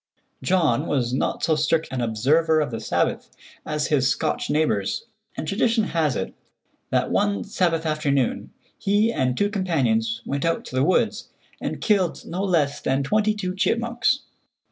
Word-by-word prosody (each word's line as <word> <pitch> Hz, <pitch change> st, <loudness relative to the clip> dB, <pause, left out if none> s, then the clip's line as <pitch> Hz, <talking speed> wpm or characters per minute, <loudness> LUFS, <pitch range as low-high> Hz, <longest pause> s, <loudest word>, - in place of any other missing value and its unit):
John 165 Hz, -10 st, +2 dB
was 125 Hz, -4 st, 0 dB
not 130 Hz, -, -1 dB
so 160 Hz, -1 st, +3 dB
strict 155 Hz, +1 st, +1 dB
an 130 Hz, -1 st, -2 dB
observer 145 Hz, +9 st, +2 dB
of 150 Hz, -5 st, -1 dB
the 115 Hz, -, -4 dB
Sabbath 110 Hz, -, -1 dB, 0.4 s
as 150 Hz, -1 st, -1 dB
his 135 Hz, -4 st, +3 dB
Scotch -, -, -1 dB
neighbors, 145 Hz, -11 st, 0 dB, 0.3 s
and 155 Hz, -, -4 dB
tradition 225 Hz, +4 st, +2 dB
has 160 Hz, -8 st, 0 dB
it 95 Hz, -, -3 dB, 0.6 s
that -, -, 0 dB
one 205 Hz, 0 st, +1 dB
Sabbath 170 Hz, -5 st, 0 dB
afternoon 145 Hz, -5 st, 0 dB, 0.3 s
he 210 Hz, +3 st, +2 dB
and 125 Hz, -1 st, 0 dB
two 205 Hz, 0 st, +1 dB
companions 115 Hz, -, 0 dB
went 140 Hz, 0 st, -2 dB
out 165 Hz, 0 st, 0 dB
to -, -, -8 dB
the 130 Hz, -, +3 dB
woods 200 Hz, +7 st, +1 dB, 0.3 s
and -, -, -4 dB
killed 195 Hz, -6 st, +1 dB
no 180 Hz, +3 st, -4 dB
less 160 Hz, -7 st, +1 dB
than 135 Hz, +1 st, 0 dB
twenty 215 Hz, +7 st, +1 dB
two 185 Hz, -3 st, -3 dB
chipmunks. 235 Hz, +6 st, +1 dB
160 Hz, 160 wpm, -23 LUFS, 135-195 Hz, 0.6 s, so